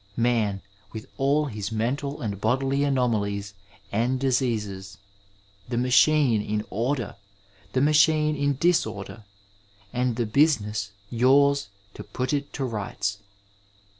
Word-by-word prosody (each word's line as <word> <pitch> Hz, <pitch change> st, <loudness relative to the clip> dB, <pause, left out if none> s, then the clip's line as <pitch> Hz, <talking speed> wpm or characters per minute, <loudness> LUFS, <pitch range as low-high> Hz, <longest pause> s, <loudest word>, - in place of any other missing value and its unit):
Man, 115 Hz, -5 st, +1 dB, 0.3 s
with 110 Hz, -1 st, -7 dB
all 140 Hz, +3 st, +2 dB
his 105 Hz, -6 st, -5 dB
mental 135 Hz, +6 st, -2 dB
and 100 Hz, -3 st, -4 dB
bodily 135 Hz, +4 st, +1 dB
anomalies 105 Hz, -7 st, 0 dB, 0.4 s
and 120 Hz, +5 st, 0 dB
diseases 110 Hz, -7 st, -1 dB, 0.4 s
— 100 Hz, +1 st, -30 dB
the 120 Hz, -, -2 dB
machine 125 Hz, -1 st, +4 dB
in 105 Hz, 0 st, -2 dB
order, 120 Hz, +2 st, -2 dB, 0.6 s
the 130 Hz, -, +2 dB
machine 155 Hz, +1 st, +4 dB
in 140 Hz, -1 st, 0 dB
disorder, 110 Hz, -, -1 dB, 0.7 s
and 125 Hz, -1 st, 0 dB
the 120 Hz, 0 st, -1 dB
business 110 Hz, -5 st, +1 dB, 0.2 s
yours 140 Hz, +2 st, +3 dB, 0.3 s
to -, -, -9 dB
put 130 Hz, +2 st, -3 dB
it 145 Hz, 0 st, -2 dB
to 135 Hz, -, -2 dB
rights. 105 Hz, -3 st, -3 dB
120 Hz, 120 wpm, -25 LUFS, 105-140 Hz, 0.7 s, machine